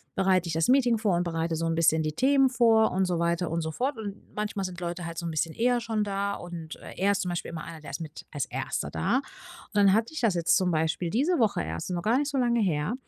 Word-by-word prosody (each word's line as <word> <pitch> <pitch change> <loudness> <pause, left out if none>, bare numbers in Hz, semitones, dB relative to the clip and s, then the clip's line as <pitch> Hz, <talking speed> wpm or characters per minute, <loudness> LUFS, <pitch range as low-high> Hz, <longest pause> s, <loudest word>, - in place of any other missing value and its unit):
bereite 185 -2 +2
ich 170 - -3
das 160 +1 +1
Meeting 245 -3 +4
vor 210 -5 +1
und 175 - +1
bereite 165 -1 -2
so 165 +1 -2
'n 165 - 0
bisschen 160 -1 +3
die 155 - -1
Themen 270 - +4
vor 225 -3 +4
und 190 +1 +1
so 180 -1 -1
weiter 170 +1 0
und 165 +1 -1
so 160 0 -3
fort. 255 - -2
Und 205 -2 -6
manchmal 210 -1 -2
sind 180 -1 -6
Leute 175 0 -4
halt 165 0 -7
so 170 - -4
'n 165 - -2
bisschen 160 +1 -1
eher 245 +1 +2
schon 225 -2 -1
da. 200 0 -2
Und 170 -2 -7 0.2
er 200 +2 +3
ist 200 - -1
zum 180 - -3
Beispiel 175 -1 -3
immer 165 -2 -6
einer, 165 -2 -9
der 150 - -9
ist 140 - -5
mit 160 -2 -8
als 145 -3 -2
Erster - - -3
da. 80 - +1
Und 275 - -2 0.5
dann 200 -2 +5
hatte 225 +7 +1
ich 310 - -4
das 220 -6 +2
jetzt 170 -1 +3
zum 185 -1 +2
Beispiel 160 +1 0
diese 285 - +1
Woche 220 -4 +2
erst, 80 +1 -5
noch 175 -2 -2
gar 235 +4 +3
nicht 290 0 -1
so 285 - -2
lange 240 -2 +2
her. 160 -1 0
185 Hz, 275 wpm, -27 LUFS, 165-225 Hz, 0.5 s, dann